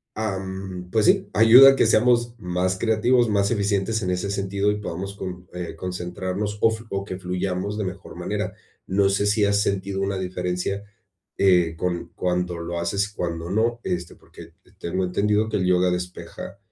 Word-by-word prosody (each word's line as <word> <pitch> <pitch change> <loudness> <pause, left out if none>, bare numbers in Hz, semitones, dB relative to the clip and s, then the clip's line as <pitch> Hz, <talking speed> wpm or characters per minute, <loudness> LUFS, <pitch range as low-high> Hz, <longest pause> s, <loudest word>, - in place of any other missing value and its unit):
am, 95 -3 -4
pues 110 -2 +2
sí, - - +3
ayuda 115 +6 +9
a - - 0
que - - +3
seamos 120 +1 +3
más 90 +1 -1
creativos, 115 +3 +2
más 100 0 +1
eficientes 100 0 0
en 90 - -1
ese 90 +2 -2
sentido, 100 +1 0
y 105 - -3
podamos 100 +1 -5
con 90 -2 -7
eh, 90 -2 -5
concentrarnos, 90 +4 -4
o 115 - +5
flu 110 +1 -7
o 100 0 -2
que 95 -2 -5
fluyamos 90 +2 -2
de 105 - -2
mejor 95 +1 -7
manera. - - -3 0.3
No 95 +1 +2
sé 100 +1 +1
si 105 0 +3
has 100 0 +2
sentido 100 -1 -1
una 100 0 -1
diferencia, 90 +1 -3 0.6
eh, 90 -4 +4
con 85 0 -2
Cuando 90 -1 -1
lo 85 +1 -4
haces, 100 +4 0
y - - -24
cuando 85 -2 -3
no, 115 +4 +1
este, 90 -1 -3
porque - - -15
te - - -25
tengo 95 +2 -2
entendido 105 +4 +1
que 110 - -1
el 95 - 0
yoga 90 0 +3
despeja, 90 +2 -6
95 Hz, 185 wpm, -24 LUFS, 90-105 Hz, 0.6 s, ayuda